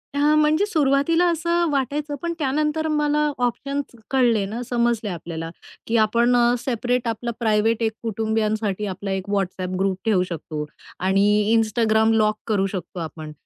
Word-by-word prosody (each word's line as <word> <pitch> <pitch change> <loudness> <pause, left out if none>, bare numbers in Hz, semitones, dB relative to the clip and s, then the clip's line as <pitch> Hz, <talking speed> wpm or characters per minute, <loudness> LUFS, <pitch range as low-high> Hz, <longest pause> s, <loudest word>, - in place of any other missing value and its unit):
हां. 295 +1 +3
म्हणजे 310 +5 +3
सुरुवातीला 315 -1 +2
असं 340 +1 0
वाटायचं, 290 +2 -1
पण 340 0 -2
त्यानंतर 300 +2 0
मला 300 -1 +1
ऑप्शन्स 275 +2 -2 0.2
कळले 240 -6 +3
ना, 220 +5 -5
समजले 235 -3 0
आपल्याला, 165 -2 -5 0.4
की 230 - +1
आपण 235 +3 +3
अ, 240 0 +4
सेपरेट 245 0 -1
आपलं 230 +1 -2
प्रायव्हेट 220 0 +2
एक 220 - +1
कुटुंबियांसाठी 215 -2 -1
आपला 195 +1 -5
एक 190 +1 -3
WhatsApp 185 -1 -2
ग्रुप 190 -1 0
ठेवू 205 -5 +3
शकतो 155 -2 -5 0.4
आणि 195 +1 +3 0.3
Instagram 220 0 +2
लॉक 215 -1 +2
करू 205 -3 +1
शकतो 180 -2 -6
आपण, 155 -1 -7
230 Hz, 145 wpm, -22 LUFS, 200-280 Hz, 0.4 s, अ